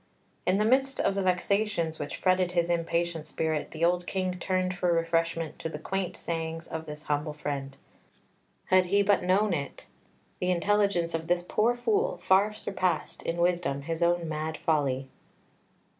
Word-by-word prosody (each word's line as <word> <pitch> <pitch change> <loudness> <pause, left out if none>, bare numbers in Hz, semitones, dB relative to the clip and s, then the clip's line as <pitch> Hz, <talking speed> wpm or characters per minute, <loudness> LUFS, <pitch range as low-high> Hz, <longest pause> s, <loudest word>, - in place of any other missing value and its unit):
In 185 +2 +4
the 210 - +2
midst 265 +3 +2
of - - +2
the 195 - -1
vexations 185 -2 0
which 145 - -4
fretted 185 -1 +2
his 170 -1 +1
impatient 170 -1 -1
spirit, 160 -2 -2
the 165 +1 0
old 175 0 +1
King 185 -1 -2
turned 185 0 0
for 180 -1 +1
refreshment 165 -1 0
to 160 - -3
the 150 - -5
quaint 185 +3 -3
sayings 165 -1 -3
of 160 0 -6
this 150 0 -7
humble 150 +1 -1
friend; 140 -2 -4 0.9
had 185 -1 +5
he 200 +2 +3
but 200 0 +3
known 190 +2 +2
it, 140 -4 -4 0.5
the 180 - 0
intelligence 185 -1 +2
of 165 0 -3
this 175 0 +1
poor 235 +3 +2
Fool 430 - +1
far 195 +3 +3
surpassed 185 -3 -2
in 165 - -3
wisdom 170 -5 +1
his 165 +3 -3
own 170 0 +2
mad 155 0 -3
folly. 135 -4 0
175 Hz, 165 wpm, -28 LUFS, 160-190 Hz, 0.9 s, had